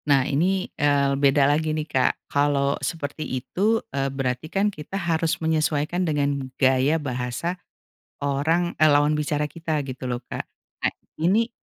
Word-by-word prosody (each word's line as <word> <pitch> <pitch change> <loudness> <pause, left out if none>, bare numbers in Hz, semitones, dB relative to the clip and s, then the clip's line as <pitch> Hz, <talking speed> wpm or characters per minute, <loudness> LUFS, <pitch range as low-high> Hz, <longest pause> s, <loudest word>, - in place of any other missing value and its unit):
Nah 135 -2 +5
ini 185 +8 +1 0.2
eee, 140 -1 +3
beda 140 0 +4
lagi 155 +2 +1
nih 155 - -2
Kak, 135 -4 +1
kalau 140 -1 +1
seperti 155 -2 -4 0.2
itu, 195 - +1 0.2
eee, 135 0 0
berarti 135 +2 -3
kan 200 +3 +1
kita 155 +5 -6
harus 165 -3 0
menyesuaikan 160 +2 0
dengan 140 -3 0
gaya 135 +4 +3
bahasa 130 +3 -3 0.7
orang, 155 +5 0
eee, 155 0 +5
lawan 145 +1 +3
bicara 150 0 -1
kita 160 0 -2
gitu 130 0 -6
loh 120 -1 -2
Kak. - - -4 0.4
Nah - - +2 0.2
ini, 200 +9 +2
150 Hz, 150 wpm, -24 LUFS, 140-160 Hz, 0.7 s, Nah